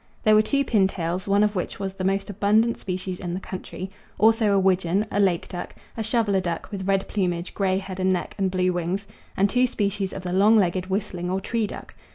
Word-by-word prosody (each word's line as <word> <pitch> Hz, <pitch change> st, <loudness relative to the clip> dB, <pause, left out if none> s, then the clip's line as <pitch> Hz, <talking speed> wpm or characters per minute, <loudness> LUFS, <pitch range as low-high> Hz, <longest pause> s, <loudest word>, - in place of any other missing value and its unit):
There 215 Hz, -, +5 dB
were 215 Hz, -, +7 dB
two 275 Hz, +6 st, 0 dB
pintails, 190 Hz, -5 st, 0 dB
one 200 Hz, +1 st, +4 dB
of 210 Hz, 0 st, +1 dB
which 180 Hz, -, -3 dB
was 195 Hz, -1 st, -3 dB
the 195 Hz, -1 st, -5 dB
most 195 Hz, +1 st, 0 dB
abundant 215 Hz, +4 st, +2 dB
species 185 Hz, -1 st, -4 dB
in 175 Hz, -1 st, -4 dB
the -, -, -3 dB
country; 185 Hz, 0 st, -7 dB, 0.3 s
also 220 Hz, -1 st, +4 dB
a -, -, +4 dB
widgeon, 190 Hz, +1 st, +2 dB
a 205 Hz, -, 0 dB
lake 185 Hz, -4 st, +2 dB
duck, 175 Hz, -, -7 dB, 0.2 s
a 225 Hz, -, -3 dB
shoveller 220 Hz, -3 st, +1 dB
duck, 170 Hz, -2 st, -4 dB
with 190 Hz, -2 st, -4 dB
red 195 Hz, 0 st, +1 dB
plumage, 180 Hz, -3 st, -2 dB
grey 190 Hz, -2 st, +1 dB
head 190 Hz, -1 st, -6 dB
and 185 Hz, 0 st, +2 dB
neck, 180 Hz, -, -2 dB
and 190 Hz, -1 st, +2 dB
blue 185 Hz, 0 st, +1 dB
wings; 175 Hz, +3 st, -2 dB, 0.3 s
and 195 Hz, -, +4 dB
two 250 Hz, +4 st, +2 dB
species 200 Hz, -4 st, -1 dB
of 190 Hz, -, -7 dB
the 180 Hz, -1 st, -3 dB
long 205 Hz, +4 st, +5 dB
legged 185 Hz, -2 st, +1 dB
whistling 185 Hz, -2 st, -2 dB
or 190 Hz, +1 st, 0 dB
tree 225 Hz, +2 st, -1 dB
duck. -, -, -9 dB
195 Hz, 220 wpm, -24 LUFS, 185-205 Hz, 0.3 s, were